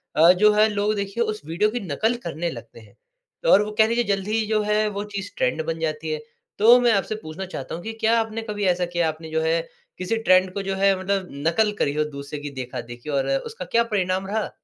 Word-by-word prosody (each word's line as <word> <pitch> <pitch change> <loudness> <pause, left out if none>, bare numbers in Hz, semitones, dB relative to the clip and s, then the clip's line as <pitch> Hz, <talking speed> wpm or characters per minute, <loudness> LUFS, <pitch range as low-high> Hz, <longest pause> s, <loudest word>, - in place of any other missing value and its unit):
अ, 165 +3 +7
जो 210 +3 +5
है 215 +1 +5
लोग 205 +1 +1
देखिए 200 +3 -1
उस 215 -1 -3
वीडियो 170 +7 +1
की 245 - -2
नकल 215 +10 0
करने 170 +1 -2
लगते 115 -2 -11
हैं। 105 -3 -18 0.5
तो - - +1
और - - +7
वो 210 - -5
कह 220 - +7
लीजिए 235 +1 +1
जल्दी 195 +2 -5
ही 220 - 0
जो 215 0 +1
है 210 +1 +1
वो 205 0 -4
चीज़ 200 0 -4
ट्रेंड 130 +6 +1
बन 165 0 -3
जाती 160 0 -3
है। 155 -1 -3 0.4
तो 235 +4 +8
मैं 240 -1 +4
आपसे 200 +2 0
पूछना 155 +5 -6
चाहता 150 -7 -6
हूँ 170 - -8
कि 225 - -5
क्या 230 +1 +4
आपने 225 0 -3
कभी 205 -1 -2
ऐसा 180 0 -1
किया 175 -1 0
आपने 160 +1 -7
जो 160 0 +1
है 165 +1 +1 0.4
किसी 185 +5 -1
ट्रेंड 185 -4 +4
को 200 - -3
जो 195 0 -2
है 195 0 +3
मतलब 190 0 -1 0.2
नकल 210 +6 +2
करी 140 - +1
हो 150 +1 +1
दूसरे 140 +1 -7
की 145 0 -6
देखा-देखी 120 +1 -7
और 135 -2 0 0.2
उसका 180 - -7
क्या 235 0 +4
परिणाम 190 -4 -1
रहा? 210 +1 -2
190 Hz, 240 wpm, -23 LUFS, 160-215 Hz, 0.5 s, तो